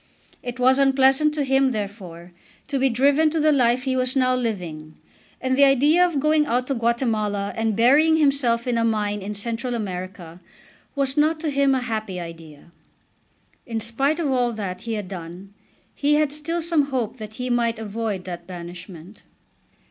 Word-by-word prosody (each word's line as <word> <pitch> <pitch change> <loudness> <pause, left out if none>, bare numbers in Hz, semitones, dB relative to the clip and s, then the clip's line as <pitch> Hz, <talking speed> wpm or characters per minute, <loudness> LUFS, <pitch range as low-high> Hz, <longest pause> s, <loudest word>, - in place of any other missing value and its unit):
It 245 0 -6
was 260 +2 +4
unpleasant 270 +2 +4
to 295 - 0
him, 270 -1 +2
therefore, 190 -5 -7 0.4
to 275 -2 -1
be 270 +1 +3
driven 280 +6 +3
to 320 +1 -2
the 310 0 +4
life 250 -2 +2
he 260 -1 -1
was 255 0 0
now 255 -1 +3
living. 175 -11 -4 0.4
And 260 0 0
the 280 +1 +6
idea 290 +6 +4
of 345 -5 +1
going 305 +1 +2
out 250 -1 0
to 275 - 0
Guatemala 225 -4 -1
and 225 -1 -1
burying 290 +8 +4
himself 275 -6 +2
in 240 -2 0
a - - +1
mine 210 -2 -1
in 205 +2 -5
Central 230 +4 -3
America 185 -4 -6 0.5
was 275 0 -1
not 310 +2 +2
to 315 -3 -1
him 275 -1 +2
a 260 - -1
happy 215 -6 -4
idea. 165 -2 -11 1.0
In 225 -2 -3
spite 270 +8 0
of 300 -5 0
all 245 -2 +1
that 195 -4 -5
he 230 - -4
had 205 -3 -5
done 180 +1 -9 0.4
he 295 +1 +1
had 300 -1 +1
still 330 +3 -3
some 325 -3 +2
hope 255 -4 -3
that 215 -1 -9
he 250 +1 -3
might 235 -1 +1
avoid 215 -3 -4
that 175 -2 -7
banishment. 175 +1 -10
240 Hz, 180 wpm, -23 LUFS, 205-275 Hz, 1.0 s, the